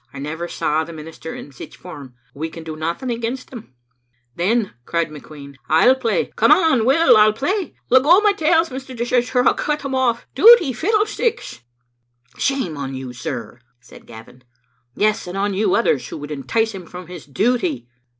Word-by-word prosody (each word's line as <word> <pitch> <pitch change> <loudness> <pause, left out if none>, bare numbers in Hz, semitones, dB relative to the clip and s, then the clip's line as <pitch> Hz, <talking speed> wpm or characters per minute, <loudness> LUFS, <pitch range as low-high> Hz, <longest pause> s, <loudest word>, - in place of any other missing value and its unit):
I - - -11
never 155 +5 -5
saw 155 -2 -1
the 165 +1 -9
minister 160 +1 -9
in 145 - -10
sic 130 - -11
form. 145 -8 -11 0.2
We 155 +3 -5
can 165 0 -10
do 160 -1 -7
nothing 170 +11 -3
against 235 +2 -4
him." 220 - -11 0.6
"Then," 205 +5 0
cried 170 +3 -1
McQueen, 145 -1 -11 0.2
"I'll 165 +12 +5
play. 250 -4 -1
Come - - +3
what 320 -10 +4
will, 280 +6 +5
I'll 215 0 +5
play. 345 - -2 0.2
Let 260 +1 +7
go 335 +8 +6
my 415 -1 +3
tails, 330 -2 +2
Mr. 260 0 -8
Dishart, 245 +2 0
or 250 0 +4
I'll - - +5
cut 300 0 -2
them 275 - -5
oflE. 255 -3 +1
Duty? 345 - +7
Fiddlesticks!" 425 - -1 0.8
"Shame 260 - -1
on 135 -1 -5
you, 130 -1 -7
sir," 120 0 -6 0.2
said - - -17
Gavin; 115 +3 -14 0.5
"yes, 210 -2 0
and 180 +2 -6
on 200 +1 0
yon 195 0 +1
others 190 - +1
who - - -7
would 145 0 -8
entice 220 +11 -1
him 185 -5 -9
from 180 +1 -9
his 175 -3 -11
duty." 245 - -1
215 Hz, 180 wpm, -20 LUFS, 155-265 Hz, 0.8 s, Let